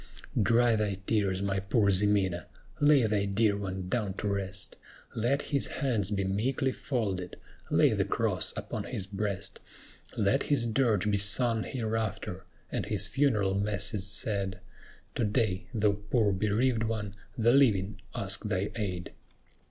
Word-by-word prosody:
Dry 115 +3 +4
thy 105 -2 0
tears, 100 -3 +1
my 100 -1 0
poor 100 +1 +2
Ximena; 95 -2 +1 0.3
lay 145 -4 +5
thy 105 -2 +1
dear 100 +1 +2
one 95 -2 -4
down 105 -2 -1
to 105 - -3
rest; 100 -1 -3 0.4
Let 125 +6 +1
his 140 -2 0
hands 115 -8 0
be 100 -2 0
meekly 125 +8 0
folded, 100 -11 -3 0.3
lay - - +4
the - - +1
cross - - +1
upon - - -4
his 95 - -4
breast; 100 -1 -3 0.6
Let - - +2
his 140 -5 +1
dirge 110 -4 +2
be 100 - +2
sung 110 +3 +3
hereafter, 110 -5 -3 0.3
and - - -2
his - - +1
funeral 115 -9 +1
masses 100 0 -1
said; 95 -2 -1 0.5
To - - -1
day, 105 -2 0
thou 105 -4 +2
poor 105 +2 +1
bereaved 110 +5 +1
one, 110 -3 -2 0.2
the 120 +1 +4
living 105 -7 +3
ask 100 0 -1
thy 100 0 -1
aid. 95 -6 -3
105 Hz, 145 wpm, -29 LUFS, 100-115 Hz, 0.6 s, lay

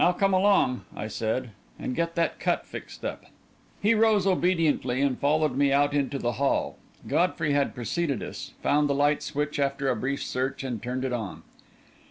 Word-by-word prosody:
"Now, 180 - +5
come 195 +2 +2
along," 185 -9 +3
I 105 - -4
said, 110 +3 -2 0.3
"and 125 - -4
get 170 0 -1
that 170 0 0
cut - - 0
fixed - - -9
up." - - -4 0.6
He 210 +3 +5
rose 215 -3 +3
obediently 165 -9 +2
and 140 -2 +1
followed 150 -1 +2
me 140 0 +3
out 145 +1 +3
into 140 -1 0
the 120 -2 -1
hall. 140 - +1 0.3
Godfrey 165 -4 +1
had 140 -1 +1
preceded 140 +2 -1
us, - - -7
found 145 0 +3
the 140 - +2
light 145 +1 +2
switch 150 0 -2
after 140 0 0
a 125 - +2
brief 135 +5 -2
search, 130 +1 -2
and 120 -5 -4
turned 125 +2 -3
it 130 - -2
on. 110 -5 -4
140 Hz, 185 wpm, -27 LUFS, 130-165 Hz, 0.6 s, Now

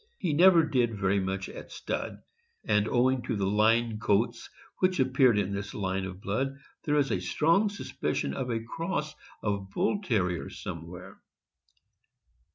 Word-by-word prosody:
He 175 -7 -1
never 170 +1 +7
did 120 -7 +1
very 100 0 +2
much 95 0 -2
at - - -10
stud, - - -4 0.4
and 105 +1 +2
owing 130 +2 +2
to 120 -1 -3
the 100 -2 0
line 110 +2 +2
coats 115 +3 0 0.3
which 185 -2 +2
appeared 130 -3 +4
in 100 -1 0
this 100 +1 -5
line 95 -1 -2
of 95 0 -8
blood, 135 +8 -2 0.3
there 150 -1 +2
is 140 -2 +2
a 90 - 0
strong 165 - +2
suspicion 200 - -3
of 125 - -3
a 115 -1 -1
cross 155 +4 -3 0.3
of 100 -2 -2
Bull 200 - 0
Terrier 95 - 0
somewhere. 85 +1 -8
115 Hz, 155 wpm, -29 LUFS, 100-140 Hz, 0.4 s, never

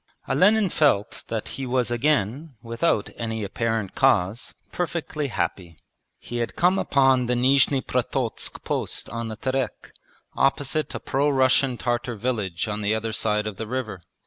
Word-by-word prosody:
Olenin 200 - +4
felt 140 -12 +1
that 110 -2 -3
he 135 - -5
was 125 -1 +1
again, 135 +2 0
without 115 0 0
any 110 -2 -3
apparent 110 -1 -2
cause, 95 +7 +2 0.2
perfectly 160 -4 -2
happy. 85 - -3 0.4
He 120 - -6
had 120 -1 -2
come 180 +3 +3
upon 135 -3 +3
the 125 - +1
Nizhni 135 +2 +4
Prototsk 125 -1 -2
post - - -2
on 115 0 -3
the 110 - -5
Terek, 130 +3 -3 0.4
opposite 145 +2 0
a - - -3
pro 140 +2 +1
Russian 130 -1 +3
Tartar 120 0 -1
village 105 -6 -2
on 105 0 -3
the 105 +1 +1
other 110 0 -3
side 105 -1 0
of 105 -2 -5
the 110 - -5
river. 110 -6 -4
120 Hz, 150 wpm, -24 LUFS, 110-135 Hz, 0.4 s, Olenin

